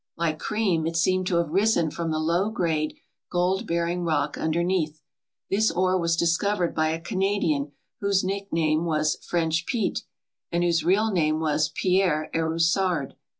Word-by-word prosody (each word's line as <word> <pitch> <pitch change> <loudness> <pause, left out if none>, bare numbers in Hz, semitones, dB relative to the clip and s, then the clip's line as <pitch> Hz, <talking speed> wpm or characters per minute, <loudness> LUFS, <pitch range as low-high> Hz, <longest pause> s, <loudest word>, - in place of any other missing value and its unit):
Like 160 -2 -1
cream, 195 -7 0
it 165 - -3
seemed 185 +2 +2
to 180 - +1
have 170 -3 0
risen 195 -4 +2
froni 170 -1 -3
the 155 - -1
low 170 +6 +1
grade 160 -7 -1 0.3
gold 185 +5 0
bearing 170 +1 -1
rock 155 -4 0
underneath. 160 -1 -1 0.5
This 215 +3 +3
ore 185 +2 +1
was 170 -2 +1
dis 170 0 +2
covered 200 -4 0
by 155 0 +1
a 160 +1 -2
Canadian 165 -6 -1 0.3
whose 200 -1 +1
nickname 170 -5 0
was 155 -2 0
French 170 -1 -1
Pete 235 -4 -1 0.5
and 170 +1 +1
whose 170 -2 +2
real 205 +6 +2
name 155 -4 +1
was 155 -1 +1
Pierre 180 -5 +1
Erussard. 165 -1 +1
170 Hz, 155 wpm, -25 LUFS, 160-185 Hz, 0.5 s, This